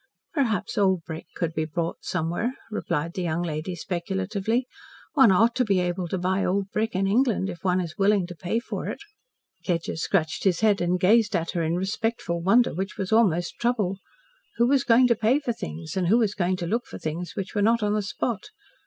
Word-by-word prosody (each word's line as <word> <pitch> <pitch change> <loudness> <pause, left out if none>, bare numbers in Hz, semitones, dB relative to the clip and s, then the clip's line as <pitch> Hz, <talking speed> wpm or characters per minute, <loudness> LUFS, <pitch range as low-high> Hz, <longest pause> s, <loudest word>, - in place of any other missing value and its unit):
"Perhaps 230 - 0
old 190 -4 +2
brick 160 0 -7
could 165 -2 -2
be 155 - -1
bought 165 +2 -3
somewhere," 180 +9 -2 0.2
replied 170 -5 -2
the 190 - -3
young 170 0 -1
lady 165 +2 -3
speculatively. 190 +7 -2 0.5
"One 265 -9 +6
ought 225 +6 +4
to 255 - +3
be 200 -5 +2
able 180 0 -1
to 190 - -2
buy 185 +2 0
old 195 +1 0
brick 220 -1 -1
in 190 +1 +1
England, 215 -1 +2
if 170 - -11
one 185 -1 +2
is 170 -1 -5
willing 200 -1 +3
to 175 0 -9
pay 180 +6 -1
for 235 - -5
it." - - -3 0.7
Kedgers 165 -2 -2
scratched 160 -4 0
his 185 -2 +2
head 210 -3 +3
and 175 +1 +1
gazed 215 +3 +4
at 165 0 -1
her 175 - -1
in 165 +1 0
respectful 190 -2 -2
wonder 215 +8 +4
which 190 +4 -4
was 195 0 -3
almost 185 -6 +2
trouble. 210 -6 0 0.6
Who 235 - +4
was 270 +1 +3
going 245 0 +5
to 240 -1 +4
pay 225 +5 +3
for 255 -5 -2
things, 80 - -7
and 185 -2 0
who 215 +6 +5
was 220 -4 +2
going 185 -2 0
to 175 - -4
look 230 +8 -1
for - - -8
things 165 +2 -5
which 195 -1 -4
were 205 - 0
not 225 +2 +3
on 210 0 +1
the 210 - +1
spot? 210 +2 -3
190 Hz, 215 wpm, -25 LUFS, 175-220 Hz, 0.7 s, One